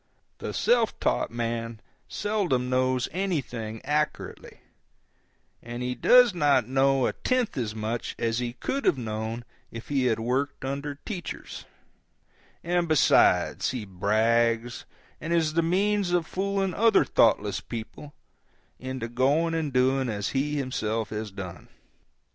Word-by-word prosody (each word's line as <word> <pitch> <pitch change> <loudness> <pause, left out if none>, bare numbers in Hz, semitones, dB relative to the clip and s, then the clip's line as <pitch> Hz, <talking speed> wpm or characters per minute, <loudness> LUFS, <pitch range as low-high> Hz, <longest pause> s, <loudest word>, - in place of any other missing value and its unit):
The - - -4
self 235 -2 +1
taught - - 0
man 115 -1 -3 0.3
seldom 180 -13 -1
knows 130 -1 +1
anything 130 - -3
accurately, 150 +2 -3 1.0
and 120 +1 -6
he 125 0 -1
does 245 - +6
not 145 -8 +3
know 135 0 +2
a - - 0
tenth 255 -3 0
as 110 -4 -3
much 110 +2 -3
as 115 0 0
he 120 -1 -3
could 275 - -3
have 155 - +3
known 110 0 -4 0.2
if 115 0 -9
he 135 -3 +1
had 115 -3 +1
worked 130 +4 -2
under 140 +2 -3
teachers; 175 +4 -7 1.0
and, 175 0 0
besides, 155 -3 +3
he 125 -4 -4
brags, 115 +5 +1 0.4
and 155 - -4
is 160 -2 +2
the 165 - +3
means 195 +3 +1
of 175 -2 +2
fooling 195 +1 -1
other 225 -1 +4
thoughtless - - +2
people 120 +6 -8 0.6
into 130 -2 -4
going 140 +8 +1
and 160 -3 -1
doing 130 0 +2
as 105 -2 -2
he 145 +2 -1
himself 115 -5 -2
has 105 0 -4
done. 95 -4 -9
130 Hz, 135 wpm, -26 LUFS, 115-165 Hz, 1.0 s, does